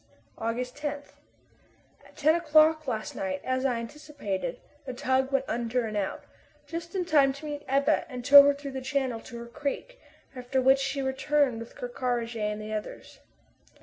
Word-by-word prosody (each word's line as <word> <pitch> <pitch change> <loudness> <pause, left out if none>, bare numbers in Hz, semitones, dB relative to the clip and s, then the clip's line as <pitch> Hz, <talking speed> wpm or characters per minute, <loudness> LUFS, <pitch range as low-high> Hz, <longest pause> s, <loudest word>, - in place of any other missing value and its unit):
August 240 +3 -3
10. 290 -1 -4 1.0
At - - -22
ten 305 +1 +4
o'clock 310 -2 +4
last 220 -4 -3
night, 190 -1 -2
as 255 +1 -1
I 250 - 0
anticipated, 230 -5 -5 0.3
the 255 - -4
tug 260 +2 +1
went 270 -1 +1
under 235 +1 -1
and 215 -1 -5
out, 200 -2 -2 0.4
just 335 +4 -6
in 365 -2 0
time 285 -5 +4
to 280 +3 -10
meet 295 -1 -4
the - - -7
Ebba 280 +3 +2
and 250 -2 -7
tow 285 +1 +11
her 285 0 +4
through 280 -1 -7
the 265 0 -5
channel 260 -3 -1
to 235 +1 -10
her 235 - -7
creek, 290 - -5 0.3
after 250 +1 -1
which 265 +1 +5
she 275 0 -2
returned 265 -1 +1
with 230 - -10
Ker 245 - -5
Karraje 240 -2 -2
and 210 - -5
the 215 0 -6
others. 215 -1 -7
265 Hz, 180 wpm, -28 LUFS, 235-290 Hz, 1.0 s, tow